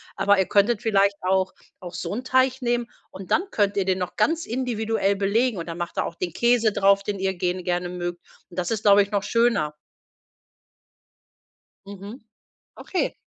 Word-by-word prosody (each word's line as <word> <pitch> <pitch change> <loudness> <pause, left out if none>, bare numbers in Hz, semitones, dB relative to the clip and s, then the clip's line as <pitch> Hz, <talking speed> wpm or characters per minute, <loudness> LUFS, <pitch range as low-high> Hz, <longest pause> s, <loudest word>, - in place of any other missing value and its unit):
Aber 200 +1 +3
ihr 190 - +3
könntet 205 +2 +2
vielleicht 200 -2 +2
auch 190 0 +1 0.3
auch 180 -1 -9
so - - -4
'n 245 +4 -4
Teig 260 +1 +2
nehmen 240 -1 0 0.2
und 190 0 -10
dann 360 - +3
könnt 205 -1 +1
ihr 190 - +1
den 190 -1 +1
noch 180 - -4
ganz 330 +1 +1
individuell 225 -4 0
belegen. 210 +3 +1
Und 165 - -6
dann 165 0 -6
macht 175 0 -5
ihr - - +1
auch 170 - -6
den 175 -2 -3
Käse 235 -1 +3
drauf, 200 0 +3
den 200 -2 -3
ihr 190 0 0
gen 180 0 -2
gerne 175 0 -1
mögt. 175 -1 -5 0.3
Und 175 - -15
das 175 +4 -2
ist, 220 -1 -2
glaube 205 -1 +6
ich, 200 - -10
noch 205 -1 0
schöner. 230 -9 +1 2.1
Mhm. 200 +4 -9 0.6
Okay. 370 - -2
200 Hz, 185 wpm, -24 LUFS, 185-230 Hz, 2.1 s, glaube